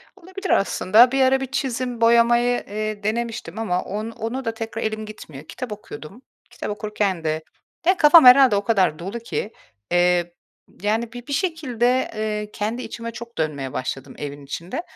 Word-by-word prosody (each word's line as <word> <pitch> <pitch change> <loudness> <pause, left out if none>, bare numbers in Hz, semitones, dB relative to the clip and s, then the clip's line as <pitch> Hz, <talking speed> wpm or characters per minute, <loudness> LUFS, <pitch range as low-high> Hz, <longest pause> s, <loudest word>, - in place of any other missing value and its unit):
Olabilir 375 +2 -8
aslında. 215 +5 +4
Bir 270 0 +1
ara 265 0 +4
bir - - -1
çizim 250 -3 -2
boyamayı, 235 +1 +4
eee, 215 0 -4
denemiştim 225 -3 -3
ama 185 -5 0
on 215 +3 -4
ona 230 +4 -5
da 225 - -1
tekrar 225 0 -5
elim 215 0 -3
gitmiyor. 155 -10 -10
Kitap 250 +7 -7
okuyordum. 205 - -9 0.3
Kitap - - -6
okurken 205 -4 -2
de... 155 0 -1 0.4
de 370 +2 +4
kafam 305 -1 +8
herhâlde 250 -3 +8
o 200 - 0
kadar 195 -8 +2
dolu 195 +7 -5
ki. 225 -2 -4 0.4
Eee, 175 -1 +2 0.5
yani, 220 +3 -1
bi 245 0 -9
bir 285 - -3
şekilde, 260 - 0
eee, 210 -1 -3
kendi 220 +4 -3
içime 230 -2 -6
çok 235 0 -10
dönmeye 145 -4 -2
başladım 135 +1 -5
evin 145 -1 -7
içinde. 170 - -5
220 Hz, 165 wpm, -22 LUFS, 195-245 Hz, 0.5 s, kafam